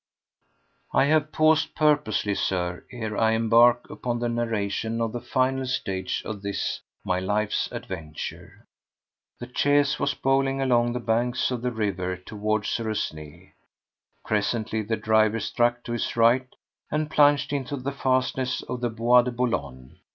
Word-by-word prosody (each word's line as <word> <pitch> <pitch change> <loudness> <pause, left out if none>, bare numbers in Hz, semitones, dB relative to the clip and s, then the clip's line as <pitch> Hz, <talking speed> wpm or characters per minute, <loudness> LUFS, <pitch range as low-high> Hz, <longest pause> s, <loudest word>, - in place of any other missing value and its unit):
4. - - +4
I - - +4
have 155 +1 +2
paused 155 0 +2
purposely, 145 -9 +2
Sir, 90 -2 -2
ere 110 -4 -4
I 110 +1 +3
embark 115 +2 +4
upon 120 -1 -3
the 120 0 -1
narration 115 -1 -2
of 115 -1 -1
the 120 - -4
final 130 0 0
stage 95 -8 -2
of 105 -2 -5
this, 100 0 -3 0.2
my 90 0 0
life's 105 +3 -1
adventure. 80 -5 -7 0.7
The 120 0 -8
chaise 145 +1 +2
was 140 - 0
bowling 135 0 +1
along 120 -3 +2
the 125 - -2
banks 120 +2 0
of 125 -2 -2
the 125 0 -1
river 95 -5 -2
toward 105 +2 -2
Suresnes. 85 -8 -4 0.7
Presently 110 +1 -1
the 110 +1 -2
driver 110 0 +2
struck 120 +2 0
to - - -6
his 120 - -2
right 120 +3 +4 0.4
and 155 0 -2
plunged 145 -1 +4
into 140 0 -2
the 135 +2 -3
fastnesses 130 -1 0
of 125 - -5
the 120 - 0
Bois 120 +2 +4
de 125 - -3
Boulogne. 70 - -3
120 Hz, 150 wpm, -25 LUFS, 105-130 Hz, 0.7 s, 4